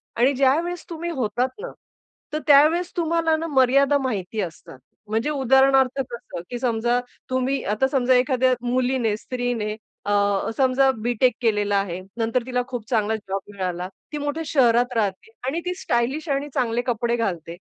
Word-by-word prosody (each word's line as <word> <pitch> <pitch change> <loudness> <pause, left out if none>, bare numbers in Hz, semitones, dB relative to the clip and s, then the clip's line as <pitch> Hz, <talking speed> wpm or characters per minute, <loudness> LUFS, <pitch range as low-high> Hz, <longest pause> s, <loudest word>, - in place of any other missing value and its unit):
आणि 255 +4 +3
ज्यावेळेस 310 +7 +1
तुम्ही 340 +1 -4
होतात 250 -2 -1
ना, - - -6 0.6
तर 305 - 0
त्यावेळेस 310 +5 +5
तुम्हाला 330 -1 +2
ना 330 - -3
मर्यादा 275 0 +4
माहिती 220 -6 -2
असतात. 160 -6 -8 0.3
म्हणजे 225 +6 -1
उदाहरणार्थ 265 -1 +3
कसं, 235 -8 -7
की 245 -1 -4
समजा 240 0 +1 0.3
तुम्ही 260 +1 0
आता 265 +5 +2
समजा 260 -2 +2
एखाद्या 255 0 +3
मुलीने, 245 -2 0
स्त्रीने 245 -4 -3 0.3
अ, 205 - -1 0.5
समजा 265 0 +3
बी-टेक 245 +2 +2
केलेलं 210 -3 +1
आहे. 190 -3 -1 0.2
नंतर 230 +2 0
तिला 250 -1 0
खूप 245 -4 -5
चांगला 220 -2 +1
जॉब 195 -2 -4
मिळाला, 180 -2 -3 0.3
ती - - -2
मोठ्या 290 +2 -3
शहरात 245 -3 +3
राहते 205 0 -1 0.2
आणि 310 +6 -1
ती 360 - -1
स्टायलिश 265 +7 -1
आणि 280 +1 -1
चांगले 240 -3 0
कपडे 235 0 0
घालते. 175 -7 -3
250 Hz, 155 wpm, -23 LUFS, 225-275 Hz, 0.6 s, त्यावेळेस